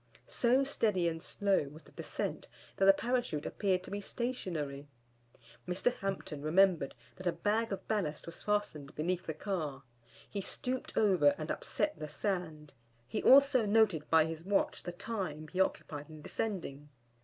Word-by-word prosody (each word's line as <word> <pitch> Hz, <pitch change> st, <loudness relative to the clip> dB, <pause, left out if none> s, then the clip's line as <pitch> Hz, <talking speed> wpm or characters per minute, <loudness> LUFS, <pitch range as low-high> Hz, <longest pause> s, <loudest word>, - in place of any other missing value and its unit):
So 255 Hz, +3 st, +3 dB
steady 210 Hz, -10 st, +1 dB
and 165 Hz, -1 st, -2 dB
slow 195 Hz, -5 st, +1 dB
was 155 Hz, +3 st, -13 dB
the -, -, -18 dB
descent -, -, -4 dB, 0.3 s
that 195 Hz, -, +3 dB
the 195 Hz, -, +10 dB
Parachute 235 Hz, -8 st, -1 dB
appeared 185 Hz, -3 st, 0 dB
to -, -, -10 dB
be 205 Hz, 0 st, -3 dB
stationary. 165 Hz, -, -3 dB, 0.8 s
Mr. 185 Hz, +7 st, +1 dB
Hampton 195 Hz, -7 st, -4 dB
remembered 165 Hz, -2 st, +3 dB, 0.2 s
that 185 Hz, 0 st, -5 dB
a -, -, +4 dB
bag 215 Hz, +6 st, 0 dB
of 195 Hz, -, -4 dB
ballast 190 Hz, -9 st, -1 dB
was 170 Hz, -, -8 dB
fastened 180 Hz, -9 st, -1 dB
beneath 180 Hz, +4 st, -1 dB
the 160 Hz, -, -3 dB
car, 155 Hz, -9 st, -3 dB, 0.4 s
he 200 Hz, -, -4 dB
stooped 250 Hz, +6 st, -4 dB
over 215 Hz, +7 st, +5 dB
and -, -, -3 dB
upset 305 Hz, -, -1 dB
the 155 Hz, -, -5 dB
sand, 160 Hz, -7 st, -3 dB, 0.3 s
he -, -, -2 dB
also 265 Hz, -4 st, +6 dB
noted 205 Hz, -8 st, +3 dB
by 160 Hz, -1 st, +6 dB
his 160 Hz, 0 st, -5 dB
watch 195 Hz, +2 st, +1 dB
the 175 Hz, -, -5 dB
time 175 Hz, -6 st, -4 dB
he 185 Hz, -, -4 dB
occupied 150 Hz, -5 st, -2 dB
in 155 Hz, -1 st, -11 dB
descending. 150 Hz, -11 st, -4 dB
185 Hz, 160 wpm, -33 LUFS, 155-210 Hz, 0.8 s, the